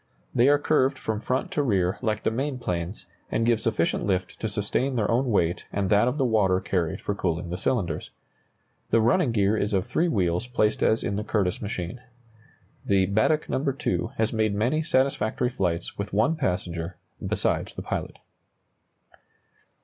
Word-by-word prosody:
They 125 +4 +5
are 145 - +6
curved 140 -2 +2
from 110 -3 -3
front 130 +3 -1
to 150 - +1
rear 95 -9 +1
like 110 -3 -1
the - - +1
main 135 +3 -2
planes, 90 -4 -4 0.2
and 115 - 0
give 115 -2 +2
sufficient 105 -8 0
lift 95 -2 -1
to 110 - -2
sustain 105 +6 -1
their 110 -2 +1
own 125 +3 +2
weight 85 -6 +1
and 100 -1 -1
that 105 +3 +5
of 125 +4 0
the 135 - +2
water 100 -6 +3
carried 85 -4 -1
for 100 - -2
cooling 85 -3 -2
the - - -2
cylinders. 90 -9 -1 0.8
The 115 - +4
running 120 +5 +3
gear 105 -1 +2
is 105 0 -1
of 95 -1 +1
three 175 - +1
wheels 95 - 0
placed 110 -3 +1
as 110 - +3
in 100 - -1
the 105 - -2
Curtiss 100 -4 0
machine. 100 +2 -4 0.8
The 95 -1 +3
"Baddeck 110 - +2
No. 130 - -1
2" 130 - -1
has 110 +1 +1
made 110 -2 +1
many 125 +9 +1
satisfactory 130 -5 +1
flights 90 -9 -2
with 100 +1 -4
one 115 +11 +3
passenger 90 - -2 0.3
besides - - -1
the - - -5
pilot. - - -4
110 Hz, 175 wpm, -26 LUFS, 95-125 Hz, 0.8 s, are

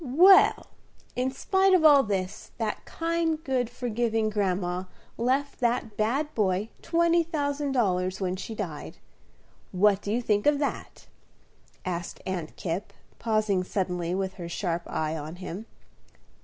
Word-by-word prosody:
"Well, 350 +9 +6 0.5
in 255 +1 0
spite 380 +8 +3
of 330 -3 +3
all 290 -2 +8
this, 195 -5 -3
that 220 -2 -3
kind, 330 -1 -1
good, 255 -5 0
forgiving 230 -2 -1
grandma 185 -3 -1 0.3
left 265 +4 0
that 235 -3 0
bad 265 +8 0
boy 200 0 0
twenty 340 0 +3
thousand 290 -3 -2
dollars 185 -6 +1
when 185 -2 -1
she 220 +4 -6
died. 165 -9 -6 0.7
What 200 +1 +3
do 205 - -4
you 240 +3 0
think 210 0 +1
of 295 -1 +5
that?" 285 -1 -4 0.8
asked 175 -1 -4
Aunt 175 -4 -4
Kipp, 180 +4 -4 0.3
pausing 215 -4 +1
suddenly 180 -2 -2
with 190 0 -2
her 170 - -5
sharp 170 -1 -2
eye 155 0 -1
on 155 +2 -6
him. 185 +4 -7
215 Hz, 140 wpm, -27 LUFS, 185-275 Hz, 0.8 s, all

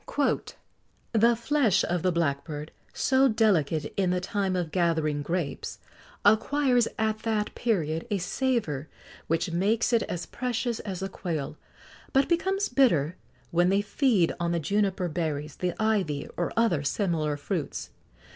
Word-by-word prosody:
"The 230 +1 +5
flesh 235 -5 +2
of 175 -1 -1
the 185 - +2
blackbird, 150 -2 -2 0.2
so 265 +1 +3
delicate 170 - +1
in 190 -2 +1
the 180 0 +1
time 190 0 -1
of 175 -3 -2
gathering 160 -4 +1
grapes, 165 -1 -3 0.5
acquires 245 +3 +4
at 220 0 0
that 220 -1 -1
period 165 -6 -1
a 205 - +1
savour 180 - -1 0.4
which 165 +2 0
makes 210 +8 +1
it 230 - +4
as 175 -1 -3
precious 240 -2 -2
as 190 -3 -5
the 195 - -2
quail, 165 -7 -4 0.6
but 270 0 +4
becomes 385 +4 +1
bitter 180 - +3 0.4
when 175 +1 +3
they 200 +1 +2
feed 205 - +2
on 170 0 0
the 170 - +1
juniper 195 +2 0
berries, 155 -2 -3
the 180 -1 -2
ivy, 200 -10 0
or 175 - -1
other 225 -10 +3
similar 155 -2 0
fruits. 155 +1 -4
185 Hz, 140 wpm, -27 LUFS, 165-225 Hz, 0.6 s, The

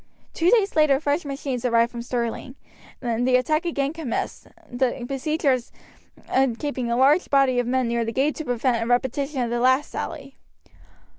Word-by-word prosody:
Two 335 +2 +2
days 415 -3 +3
later 300 -3 +4
fresh 295 +2 -1
machines 275 -3 -4
arrived 235 -1 +2
from 235 - -6
Stirling, 240 +1 -4 0.5
and 240 0 0
the 255 - +4
attack 305 +6 +1
again 285 -4 -1
commenced, 320 -8 -4 0.2
the 245 0 -1
besiegers 275 -2 -1 0.9
keeping 265 -5 -3
a 235 - 0
large 285 +7 +4
body 270 -3 +3
of 245 - -1
men 255 0 +1
near 235 0 0
the 225 - -3
gate 275 +5 +1
to 315 - -5
prevent 245 -1 0
a - - -4
repetition 260 +3 0
of 235 -1 -2
the 240 - 0
last 260 +4 +2
sally. 275 - -6
260 Hz, 170 wpm, -23 LUFS, 240-285 Hz, 0.9 s, later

